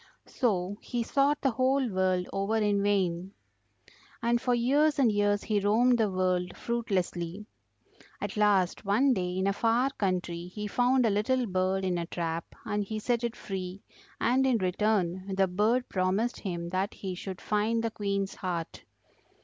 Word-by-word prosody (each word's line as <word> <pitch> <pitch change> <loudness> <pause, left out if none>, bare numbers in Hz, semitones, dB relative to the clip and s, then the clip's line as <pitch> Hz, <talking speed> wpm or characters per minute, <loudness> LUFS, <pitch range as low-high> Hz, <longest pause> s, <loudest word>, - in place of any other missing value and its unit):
So 200 -5 -1
he 240 -2 -2
sought 280 +4 +2
the 270 - +2
whole 260 +2 +2
world 185 -3 0
over 195 +3 0
in 205 -2 +2
vain; 190 -2 0 0.9
and 235 0 +2
for 250 -1 +2
years 285 +6 +3
and 255 -5 +4
years 205 0 +1
he 210 -2 +1
roamed 235 +5 +3
the 215 -2 +3
world 185 -1 -1
fruitlessly. 195 -5 -2 0.7
At - - -4
last 205 -3 +2
one 230 +7 +3
day 180 -3 -2
in 190 - 0
a 200 - +2
far 235 +5 +2
country 180 -6 -2
he 210 +3 -6
found 245 +4 +2
a 220 - +3
little 240 +5 +1
bird 190 -1 0
in 180 -2 0
a 170 - -4
trap 165 -1 -3 0.2
and 205 0 -1
he 215 +2 -5
set 235 +2 0
it 235 -1 -2
free, 190 0 -6 0.4
and 260 +3 +3
in 255 -3 +3
return 190 -1 0
the 195 0 +3
bird 215 +7 +1
promised 190 +6 0
him 170 -3 -4
that 190 +3 -2
he 190 -2 -5
should 185 +1 -6
find 220 +2 0
the 230 - -1
Queen's 200 -2 -2
heart. 175 -3 -4
205 Hz, 165 wpm, -29 LUFS, 185-235 Hz, 0.9 s, and